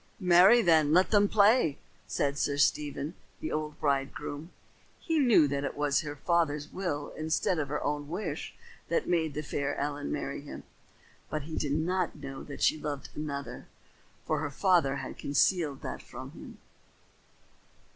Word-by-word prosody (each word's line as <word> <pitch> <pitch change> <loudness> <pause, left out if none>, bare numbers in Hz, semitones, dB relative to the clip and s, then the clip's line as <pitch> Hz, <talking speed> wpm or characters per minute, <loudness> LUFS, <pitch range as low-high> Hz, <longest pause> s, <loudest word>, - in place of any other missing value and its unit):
"Marry 185 +5 +6
then, 155 -3 +4
let 185 +5 +4
him 205 -1 +5
play," 205 - +4 0.3
said 140 +7 0
Sir 145 -1 0
Stephen, 145 +2 +1 0.3
the 155 - -4
old 155 -1 -3
bridegroom. 145 +2 -2 0.5
He 325 -3 0
knew 235 - +5
that 140 0 -2
it 140 - -4
was 145 -2 +2
her 145 -1 -6
father's 150 -1 0
will 145 -6 -3
instead 160 +2 0
of 145 - -1
her 150 +2 -3
own 145 0 -2
wish 165 -3 -4 0.3
that 170 - 0
made 160 -4 0
the 150 - -3
fair 145 -1 -2
Ellen 145 0 -3
marry - - -3
him. - - -9 0.7
But 155 -2 -3
he 155 +2 -6
did 145 -2 -1
not 175 +3 0
know 135 -1 -8
that 140 - -6
she 155 - +3
loved 145 -2 -4
another, 140 -2 -5 0.6
for - - 0
her 145 - -2
father 170 -3 +2
had 130 -2 -6
concealed 145 0 +1
it - - -5
from - - -9
him. - - -11
150 Hz, 160 wpm, -30 LUFS, 145-175 Hz, 0.7 s, Marry